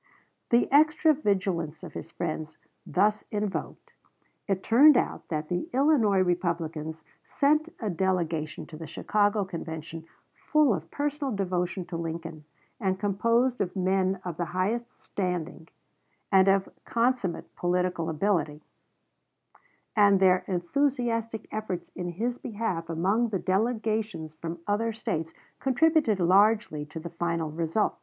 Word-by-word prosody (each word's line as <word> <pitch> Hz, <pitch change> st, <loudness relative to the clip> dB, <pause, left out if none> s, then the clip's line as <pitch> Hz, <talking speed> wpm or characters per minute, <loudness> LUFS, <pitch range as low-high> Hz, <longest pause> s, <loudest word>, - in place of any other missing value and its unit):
The 235 Hz, 0 st, +4 dB
extra 310 Hz, +2 st, +5 dB
vigilance 190 Hz, -, -1 dB
of -, -, -8 dB
his 160 Hz, -, -7 dB
friends 155 Hz, -2 st, -4 dB, 0.3 s
thus 210 Hz, +3 st, +2 dB
invoked, 210 Hz, -2 st, -4 dB, 0.5 s
it 190 Hz, -2 st, -1 dB
turned 275 Hz, +4 st, +7 dB
out -, -, -1 dB
that 155 Hz, -1 st, -3 dB
the 175 Hz, +1 st, -2 dB
Illinois 255 Hz, -9 st, +4 dB
Republicans 165 Hz, -3 st, -2 dB, 0.2 s
sent 300 Hz, +3 st, +2 dB
a 220 Hz, -, -3 dB
delegation 170 Hz, -4 st, -1 dB
to 155 Hz, -, -11 dB
the 160 Hz, 0 st, -8 dB
Chicago 205 Hz, -1 st, +1 dB
Convention 165 Hz, -2 st, -7 dB, 0.3 s
full 305 Hz, -6 st, +2 dB
of 165 Hz, -3 st, -5 dB
personal 290 Hz, -1 st, -2 dB
devotion 180 Hz, -1 st, -1 dB
to 175 Hz, -1 st, -5 dB
Lincoln 165 Hz, -2 st, -5 dB, 0.3 s
and 190 Hz, -3 st, 0 dB
composed 230 Hz, +5 st, +1 dB
of 180 Hz, -1 st, -2 dB
men 190 Hz, 0 st, +1 dB
of 175 Hz, -3 st, -4 dB
the 175 Hz, -, -1 dB
highest 235 Hz, +6 st, -1 dB
standing, 180 Hz, -3 st, -4 dB, 0.6 s
and 190 Hz, -1 st, +6 dB
of 195 Hz, 0 st, +3 dB, 0.2 s
consummate 235 Hz, -7 st, -1 dB
political 180 Hz, -1 st, 0 dB
ability, 155 Hz, -3 st, 0 dB, 1.3 s
and 200 Hz, -2 st, +5 dB
their 185 Hz, -1 st, +4 dB
enthusiastic 230 Hz, +3 st, -1 dB
efforts 185 Hz, -5 st, -4 dB
in 180 Hz, -, -5 dB
his 235 Hz, +7 st, -2 dB
behalf 205 Hz, -8 st, -3 dB
among 195 Hz, +8 st, +1 dB
the 205 Hz, -, 0 dB
delegations 215 Hz, -4 st, -1 dB
from 165 Hz, +2 st, -6 dB
other 225 Hz, +2 st, 0 dB
States 175 Hz, -8 st, -3 dB, 0.3 s
contributed 275 Hz, -, +3 dB
largely 185 Hz, -4 st, +3 dB
to 160 Hz, +2 st, -7 dB
the 170 Hz, +1 st, -7 dB
final 170 Hz, -2 st, -2 dB
result. 165 Hz, +6 st, -1 dB
190 Hz, 130 wpm, -27 LUFS, 170-225 Hz, 1.3 s, turned